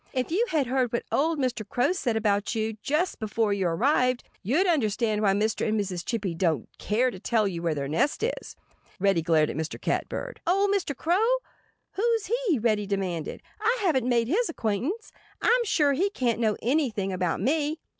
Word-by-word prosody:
"If 255 +2 -1
you 445 +8 +2
had 300 -4 +1
heard 250 -1 0
what 235 - -1
old 320 +3 +1
Mr. 250 -5 -1
Crow 245 - +1
said 250 -11 -1
about 205 0 0
you, 220 0 -1
just 310 - 0
before 215 -1 0
you 195 -3 0
arrived, 250 - +2 0.2
you'd 285 - +2
understand 220 - +1
why 200 -2 +3
Mr. 215 +3 0
and 215 0 +1
Mrs. 185 -4 -3
Chippy 205 -6 -2
don't 165 -7 0
care 245 +5 +1
to 190 - -9
tell 220 +1 +1
you 175 -3 -4
where 165 -2 0
their 140 -1 -3
nest 165 - 0
is." 485 - -3 0.4
Reddy 195 -3 +3
glared 160 -2 +2
at - - -7
Mr. 160 +1 -4
Catbird. - - -3
"Old 395 +3 +3
Mr. 355 -9 -1
Crow? 365 +7 +2 0.6
Who's 455 +1 0 0.2
he?" 330 -8 +3
Reddy 215 -3 +1
demanded. 185 -5 -3 0.2
"I 455 +4 +2
haven't 265 - +1
made 235 -2 +2
his 420 - +1
acquaintance. 270 - -2 0.3
I'm 485 0 +3
sure 295 -8 +3
he 375 +9 +1
can't 245 - -1
know 215 -3 +1
anything 230 -7 0
about 180 -2 -1
me." 305 +2 0
235 Hz, 185 wpm, -26 LUFS, 200-315 Hz, 0.6 s, why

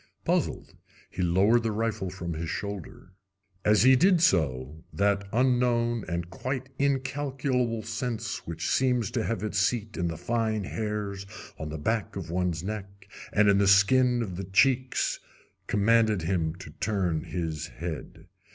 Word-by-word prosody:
Puzzled, - - -1 0.4
he - - -4
lowered 95 +7 +4
the 115 -1 -1
rifle 110 -3 -2
from 85 -2 -5
his 80 +1 -4
shoulder. 100 0 -6 0.5
As 105 0 +4
he 130 +1 +7
did 180 +5 +4
so 75 - +1
that 100 0 +1
unknown 120 -2 +2
and 85 -1 -3
quite 130 +5 -4
incalculable 135 -4 0
sense 115 -2 -4
which 85 0 -4
seems 125 -3 +1
to 115 - -1
have 110 -3 -2
its 105 -2 -1
seat 110 0 0
in 85 - 0
the 80 -1 -4
fine 110 -3 -1
hairs 105 -1 -4 0.3
on 80 - -4
the 80 - -5
back 110 +7 -1
of 85 -4 -5
one's 90 -2 -1
neck 100 -1 -6 0.2
and 105 0 +4
in 100 -1 +5
the 100 - +3
skin 120 +5 +5
of 95 -5 -6
the 95 - -4
cheeks 130 +7 +2 0.5
commanded 110 -2 +3
him 80 -2 0
to 90 -4 -10
turn 90 -3 -1
his 80 -3 -3
head. 85 -3 -7
105 Hz, 150 wpm, -27 LUFS, 90-120 Hz, 0.5 s, he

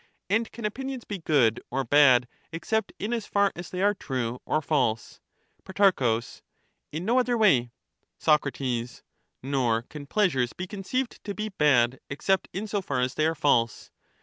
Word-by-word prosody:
And 225 +2 +1
can 235 -1 -7
opinions 260 +3 -4
be 200 -2 -6
good 135 -9 +2
or 135 +2 -1
bad 130 -2 +5 0.2
except 210 +6 -2
in 215 +4 -3
as 230 -3 -3
far 200 -1 +2
as 175 0 -8
they 185 +1 -3
are 205 +1 +4
true 125 - -4
or - - +2
false? 130 -7 -1 0.4
Pro. 185 - +2 0.7
In 160 +4 -4
no 240 +4 +3
other 245 -1 +1
way. 135 - +3 0.5
Soc. 150 -2 +3 1.0
Nor 125 -4 0
can 145 +2 -10
pleasures 140 - +1
be 185 - -5
conceived 210 +7 -4
to 200 -1 -5
be 215 0 -3
bad 130 - +3
except 190 +7 0
in 195 - -4
41 - - -7
so 205 -1 -1
far 140 -8 -2
as 125 +1 0
they 155 - +1
are 165 - -1
false. 120 -7 +1
160 Hz, 170 wpm, -26 LUFS, 130-205 Hz, 1.0 s, bad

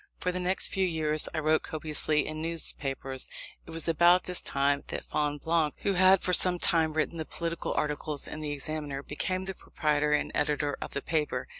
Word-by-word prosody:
For 180 - -1
the 180 - -3
next 185 +1 +1
few 190 - 0
years 155 -3 +1
I - - -5
wrote 155 0 +2
copiously 155 -1 -1
in 155 0 -5
newspapers. 135 -5 -2 0.4
It - - -12
was 165 0 -3
about 175 +2 +5
this 180 -1 -1
time 140 +1 0
that - - -5
Fonblanque, 150 +1 0
who 200 - +2
had 185 0 +5
for 180 - -1
some 180 0 +6
time 160 -2 +2
written 160 +2 -1
the - - -1
political 170 +1 -3
articles 150 0 -1
in 155 - -6
the 155 -1 -4
Examiner, 145 -1 -4
became 185 +6 -2
the 195 - -3
proprietor 150 -4 -1
and 150 - 0
editor 145 -1 0
of - - -6
the 140 - -3
paper. 150 -6 -1
155 Hz, 190 wpm, -29 LUFS, 150-170 Hz, 0.4 s, some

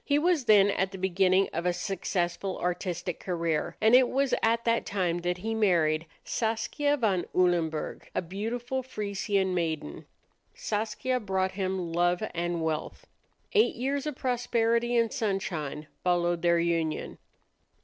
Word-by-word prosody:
He 285 - +2
was 320 -3 +2
then 205 -2 +6
at 190 -1 0
the 195 - -7
beginning 190 +1 +3
of 170 +2 -1
a 180 - +2
successful 180 0 -2
artistic 180 -1 -3
career, 170 -4 -2
and 220 +2 +4
it 250 0 +7
was 275 -1 +1
at 230 +1 +2
that 230 0 +2
time 180 -4 -1
that 175 +1 -1
he 220 +5 -3
married 165 -7 +2 0.2
Saskia 235 +6 0
van 200 -8 +1
Ulenburg, 170 -4 0
a - - +1
beautiful 230 +8 -3
Frisian 200 -5 -1
maiden. 160 - -3 0.5
Saskia 220 +4 -1
brought 190 -3 -1
him 185 -3 -3
love 175 +3 +2
and 170 -1 -2
wealth. 160 -1 -3 0.5
Eight 435 0 +4
years 275 +4 -2
of 300 - -3
prosperity 240 -2 +1
and 230 -1 +2
sunshine 175 - -2 0.2
followed 175 -1 +1
their 170 0 +3
union. 165 -2 -1
190 Hz, 140 wpm, -28 LUFS, 175-230 Hz, 0.5 s, it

